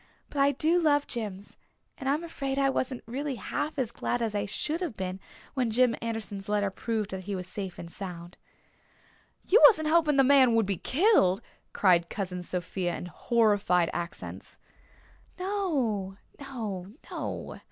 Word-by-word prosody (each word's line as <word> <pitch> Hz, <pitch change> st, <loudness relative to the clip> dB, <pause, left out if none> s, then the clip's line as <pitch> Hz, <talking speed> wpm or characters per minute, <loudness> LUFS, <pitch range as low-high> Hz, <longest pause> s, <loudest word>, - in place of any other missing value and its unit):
"But 285 Hz, -, -4 dB
I 280 Hz, +1 st, +4 dB
do 320 Hz, +6 st, +3 dB
love 290 Hz, -3 st, +3 dB
Jims, 205 Hz, -4 st, -5 dB, 0.4 s
and 270 Hz, -, -3 dB
I'm 300 Hz, +4 st, +1 dB
afraid 275 Hz, -5 st, -3 dB
I 275 Hz, -1 st, +3 dB
wasn't 255 Hz, -1 st, -2 dB
really 270 Hz, +4 st, -3 dB
half 295 Hz, +7 st, -3 dB
as 250 Hz, -4 st, -1 dB
glad 245 Hz, -, -2 dB
as 225 Hz, -3 st, -1 dB
I 205 Hz, -1 st, -1 dB
should 310 Hz, -, -2 dB
have 325 Hz, -11 st, -3 dB
been 185 Hz, 0 st, -4 dB, 0.3 s
when 255 Hz, -4 st, 0 dB
Jim 245 Hz, +1 st, +3 dB
Anderson's 215 Hz, -3 st, -4 dB
letter 205 Hz, -1 st, +1 dB
proved 215 Hz, 0 st, -2 dB
that 190 Hz, -1 st, -5 dB
he 200 Hz, -, -3 dB
was 185 Hz, -1 st, -4 dB
safe 190 Hz, -1 st, -5 dB
and 170 Hz, -, -7 dB
sound." 175 Hz, -2 st, -7 dB, 1.1 s
"You 440 Hz, +6 st, +6 dB
wasn't 315 Hz, -9 st, +3 dB
hoping 315 Hz, -3 st, +4 dB
the 270 Hz, -, +7 dB
man 260 Hz, -3 st, +6 dB
would 225 Hz, -2 st, +3 dB
be 195 Hz, -1 st, -1 dB
killed!" 260 Hz, -, +3 dB, 0.3 s
cried 175 Hz, -3 st, +3 dB
Cousin 185 Hz, -3 st, -4 dB
Sophia 180 Hz, 0 st, -3 dB
in -, -, -6 dB
horrified 195 Hz, -2 st, +2 dB
accents. 175 Hz, +1 st, -6 dB, 0.8 s
"No 280 Hz, -, -1 dB, 0.2 s
no 220 Hz, -10 st, -5 dB, 0.2 s
no! -, -, -5 dB
225 Hz, 160 wpm, -28 LUFS, 190-280 Hz, 1.1 s, the